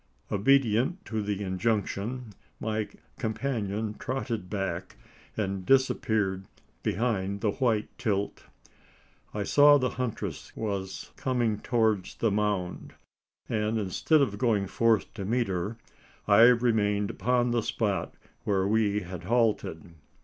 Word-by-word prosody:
Obedient 130 - +2
to 110 -1 -2
the 105 -1 -2
injunction, 105 +4 -2 0.3
my 110 -1 -1 0.3
companion 110 -3 -2
trotted 120 -7 -3
back, 95 -4 -3 0.4
and 100 -3 -2
disappeared 110 -6 +2 0.4
behind 100 -2 -1
the 110 -3 +2
white 110 -3 +1
tilt. 100 -4 -1 0.9
I 105 - -2
saw 145 +6 +6
the 125 -3 0
huntress 125 -4 -4
was 100 -3 -4
coming 120 -5 0
towards 110 -6 +1
the 115 - +1
mound; 100 -3 -2 0.5
and, 110 +1 0
instead 110 - +2
of 100 -6 -2
going 105 -5 +2
forth 115 +2 +1
to 100 - -5
meet 115 +2 0
her, 95 +5 -2 0.5
I 105 +3 +8
remained 110 -4 +3
upon 125 0 +1
the 120 -1 +2
spot 100 -5 -1 0.3
where 95 -2 +1
we 105 -1 +2
had 90 -2 -8
halted. 110 -8 0
105 Hz, 120 wpm, -28 LUFS, 100-120 Hz, 0.9 s, I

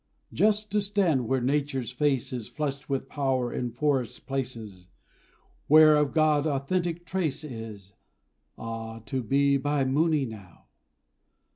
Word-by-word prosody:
Just 215 0 +2
to 210 0 +2
stand 190 - +1
where 130 0 +1
Nature's 135 -1 -1
face 135 -1 0
is 120 -4 -4
Flushed 145 -1 -4
with 135 -1 -2
power 130 -4 -1
in 125 - -2
forest 130 0 -1
places 115 -9 -5 0.8
Where 155 0 +8
of 150 -2 +2
God 155 -1 +3
authentic 170 +4 -1
trace 165 -7 -2
is 110 -7 -8 0.6
Ah, 115 0 -6
to 130 +4 -2
be 140 +4 +2
by 145 0 0
Mooni 150 +2 +2
now! 100 -6 -12
135 Hz, 130 wpm, -27 LUFS, 120-155 Hz, 0.8 s, Where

